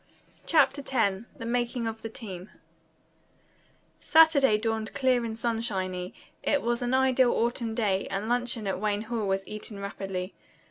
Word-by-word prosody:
CHAPTER 285 Hz, -3 st, +4 dB
X 220 Hz, -6 st, 0 dB
THE 230 Hz, -, -7 dB
MAKING 240 Hz, 0 st, -1 dB
OF 225 Hz, 0 st, -4 dB
THE 225 Hz, -, -5 dB
TEAM 195 Hz, -4 st, -8 dB, 1.5 s
Saturday 295 Hz, -8 st, +5 dB
dawned 220 Hz, 0 st, -2 dB
clear 260 Hz, -3 st, +2 dB
and 225 Hz, -1 st, -4 dB
sunshiny. 195 Hz, -6 st, -2 dB, 0.3 s
It 285 Hz, -, +1 dB
was 235 Hz, +1 st, 0 dB
an 245 Hz, +1 st, +1 dB
ideal 260 Hz, -1 st, +4 dB
autumn 235 Hz, -1 st, -1 dB
day, 200 Hz, -4 st, 0 dB
and 195 Hz, +2 st, -3 dB
luncheon 245 Hz, -2 st, 0 dB
at 195 Hz, -1 st, -2 dB
Wayne 210 Hz, 0 st, -1 dB
Hall 225 Hz, -2 st, -2 dB
was 195 Hz, 0 st, 0 dB
eaten 210 Hz, 0 st, -6 dB
rapidly. 195 Hz, -1 st, -5 dB
225 Hz, 145 wpm, -28 LUFS, 200-245 Hz, 1.5 s, Saturday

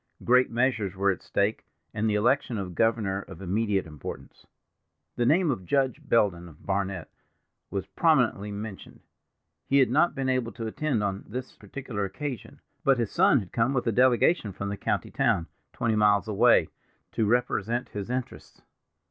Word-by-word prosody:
Great 125 Hz, +1 st, +4 dB
measures 115 Hz, -5 st, 0 dB
were 100 Hz, +1 st, +2 dB
at 95 Hz, -, -5 dB
stake, 100 Hz, +2 st, -1 dB, 0.3 s
and 110 Hz, +1 st, 0 dB
the 105 Hz, -, +1 dB
election 120 Hz, +2 st, +1 dB
of 95 Hz, -3 st, -5 dB
governor 105 Hz, -2 st, +1 dB
of 95 Hz, -4 st, -12 dB
immediate 100 Hz, +1 st, 0 dB
importance. 75 Hz, -3 st, -9 dB, 0.7 s
The 120 Hz, -, +1 dB
name 165 Hz, +2 st, +3 dB
of 105 Hz, -8 st, -4 dB
Judge 130 Hz, +6 st, 0 dB
Belden 90 Hz, -6 st, +1 dB
of 75 Hz, -, -18 dB
Barnet 95 Hz, -3 st, -2 dB, 0.6 s
was 95 Hz, -2 st, -3 dB
prominently 110 Hz, -, +1 dB
mentioned. 100 Hz, -1 st, -8 dB, 0.7 s
He 140 Hz, -, +3 dB
had 130 Hz, -4 st, +4 dB
not 155 Hz, +6 st, +3 dB
been 135 Hz, -1 st, -2 dB
able 130 Hz, -4 st, 0 dB
to 115 Hz, -, -6 dB
attend 120 Hz, 0 st, -1 dB
on 100 Hz, -1 st, -3 dB
this 125 Hz, +4 st, -6 dB
particular 125 Hz, -7 st, -6 dB
occasion, 120 Hz, +6 st, -6 dB, 0.2 s
but 135 Hz, -1 st, +4 dB
his 115 Hz, -4 st, -1 dB
son 175 Hz, -, +4 dB
had 95 Hz, -, -11 dB
come 120 Hz, +4 st, +1 dB
with 125 Hz, -, 0 dB
a 115 Hz, -, +2 dB
delegation 125 Hz, -, +3 dB
from 100 Hz, +2 st, -4 dB
the 100 Hz, -, -3 dB
county -, -, -2 dB
town, 85 Hz, -, +1 dB, 0.3 s
twenty 115 Hz, -2 st, -1 dB
miles 105 Hz, -2 st, +3 dB
away, 105 Hz, -2 st, +4 dB, 0.4 s
to 110 Hz, -, 0 dB
represent 120 Hz, 0 st, 0 dB
his 100 Hz, 0 st, -6 dB
interests. 125 Hz, 0 st, -5 dB
110 Hz, 165 wpm, -27 LUFS, 100-125 Hz, 0.7 s, Great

